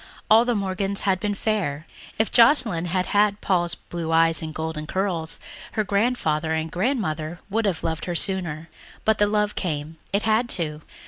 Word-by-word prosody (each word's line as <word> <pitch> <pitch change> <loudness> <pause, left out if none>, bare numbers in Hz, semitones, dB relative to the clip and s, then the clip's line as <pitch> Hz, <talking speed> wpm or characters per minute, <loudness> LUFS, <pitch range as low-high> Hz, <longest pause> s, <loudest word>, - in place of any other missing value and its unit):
All 225 +2 +7
the 245 -1 +1
Morgans 195 0 -1
had 190 -2 +1
been 205 0 -1
fair. 180 -9 -1 0.3
If 220 - +1
Joscelyn 230 - +4
had 180 +1 0
had 205 0 +2
Paul's 175 -3 0
blue 170 -2 -5
eyes 165 0 +3
and 160 -1 -5
golden 160 -1 -4
curls 180 -4 -2 0.3
her 215 - +1
grandfather 200 -7 0
and 160 0 -2
grandmother 175 - -1
would 225 +2 +1
have 185 -5 -1
loved 160 0 -2
her 175 - -3
sooner. 170 -4 0 0.4
But 220 0 +3
the 205 - +4
love 210 0 +1
came... 155 -2 -4
it 200 +1 +1
had 225 +2 +2
to. 155 -3 -3
185 Hz, 175 wpm, -24 LUFS, 160-210 Hz, 0.4 s, All